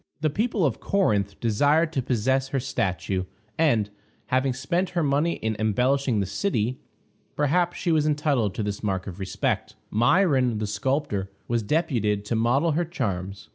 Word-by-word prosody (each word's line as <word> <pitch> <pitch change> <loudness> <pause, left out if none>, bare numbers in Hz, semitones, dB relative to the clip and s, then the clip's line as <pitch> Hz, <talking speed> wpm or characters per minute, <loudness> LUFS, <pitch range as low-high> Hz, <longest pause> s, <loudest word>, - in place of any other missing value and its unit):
The 155 -1 +1
people 215 +1 0
of 135 - 0
Corinth 105 - 0
desired 145 +9 +2
to 135 - 0
possess 130 +2 +1
her 135 0 -1
statue, 95 -7 -2 0.3
and, 115 -11 +2 0.4
having 130 +1 +2
spent 170 +9 -1
her 170 - +3
money 145 +4 +2
in 110 -1 -2
embellishing 125 +3 +1
the 100 - 0
city, 125 - -1 0.6
perhaps 170 +4 +1
she 175 - 0
was 155 -2 +3
entitled 145 - +1
to 110 - -2
this 100 -1 -3
mark 95 -3 -1
of 95 -1 -8
respect. 95 -1 -2 0.2
Myron, 130 - +3
the 105 - -2
sculptor, 105 -1 -1 0.2
was 120 -1 +1
deputed 110 - 0
to 115 - -1
model 125 +9 +2
her 165 +4 +1
charms. 100 - -4
130 Hz, 160 wpm, -25 LUFS, 105-150 Hz, 0.6 s, her